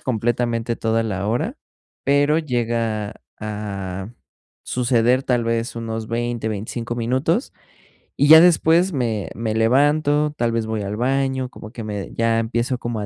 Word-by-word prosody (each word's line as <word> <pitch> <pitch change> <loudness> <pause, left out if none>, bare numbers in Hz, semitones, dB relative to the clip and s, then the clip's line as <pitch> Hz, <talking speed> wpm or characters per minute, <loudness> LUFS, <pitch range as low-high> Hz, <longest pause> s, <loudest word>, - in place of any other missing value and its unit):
completamente 120 0 -1
toda 115 0 0
la 100 -2 -2
hora, 120 +2 -1 0.5
pero 145 +2 +3
llega 115 -6 -2 0.2
a 100 -1 -5 0.5
suceder, 125 0 +2
tal 120 -3 0
vez, 115 0 -1
unos 115 -1 -4
20, 120 -1 -2
25 115 +3 -4
minutos, 130 - 0 0.7
y 145 - +3
ya 160 +1 +11
después 175 +1 +4
me 110 - -1
me 110 0 -2
levanto, 145 +6 +2
tal 120 -1 +1
vez 115 -1 -1
voy 110 -1 -2
al 100 +1 -3
baño, 130 +2 0
como 110 -3 -11
que 115 -2 -7
me 105 -2 -5
ya 115 0 +2
empiezo 120 +3 -1
como 120 -2 -3
a 105 - -3
115 Hz, 145 wpm, -21 LUFS, 110-130 Hz, 0.7 s, ya